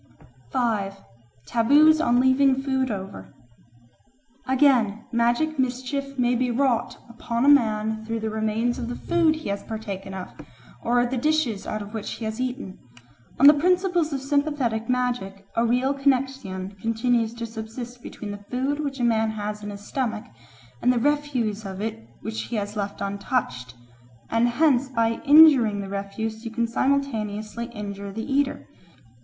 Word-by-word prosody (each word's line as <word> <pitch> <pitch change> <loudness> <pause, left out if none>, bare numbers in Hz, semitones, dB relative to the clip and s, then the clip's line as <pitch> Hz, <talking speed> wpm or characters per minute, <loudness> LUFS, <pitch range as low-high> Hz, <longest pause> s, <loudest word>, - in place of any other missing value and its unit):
5. 205 - -1 0.5
Taboos 295 +7 +5
on 245 -5 +3
Leaving 260 +1 +4
Food 265 -1 0
over 195 -2 -7 1.1
AGAIN, 255 -6 +3
magic 240 +6 +1
mischief 260 +2 -2
may 245 -1 +2
be 250 +1 +1
wrought 245 -1 0
upon 235 +1 -2
a - - +3
man 220 -5 +3
through 225 +1 -3
the 220 0 -3
remains 220 +2 -1
of 235 - -4
the 245 - -4
food 335 -2 +2
he 310 -8 -6
has 200 0 -2
partaken 200 -3 -6
of, 185 -1 -6 0.5
or 245 +1 +2
the 255 +1 -2
dishes 270 -7 0
out 215 -1 -3
of 205 +2 -11
which 220 -2 -4
he 225 - -6
has 220 +3 -3
eaten. 250 -6 -4 0.6
On 275 - +6
the 295 - +11
principles 355 +1 +1
of 275 -2 -2
sympathetic 275 -5 0
magic 245 -6 -1
a 230 - +2
real 250 +4 +2
connexion 265 -9 -1
continues 230 0 0
to 235 0 -4
subsist 230 +2 -8
between 210 -3 -7
the 205 0 -8
food 270 +4 -1
which 280 -3 -3
a - - -1
man 225 -2 +2
has 210 -1 -4
in 210 - -6
his 200 0 -8
stomach 230 -5 -2 0.6
and 250 - +4
the 250 - +1
refuse 250 -6 0
of 190 -2 -6
it 205 - -5
which 220 +1 -4
he 235 - -5
has 205 0 -3
left 200 -1 -4
untouched, 200 - -2 0.6
and 230 +1 +3
hence 265 0 +2
by 230 -2 0
injuring 280 -8 +7
the 195 -1 -5
refuse 215 +3 -4
you 230 - -4
can 235 +1 -1
simultaneously 230 -4 -1
injure 200 -3 -7
the 220 +3 -5
eater. 275 0 -1
235 Hz, 160 wpm, -24 LUFS, 215-270 Hz, 1.1 s, the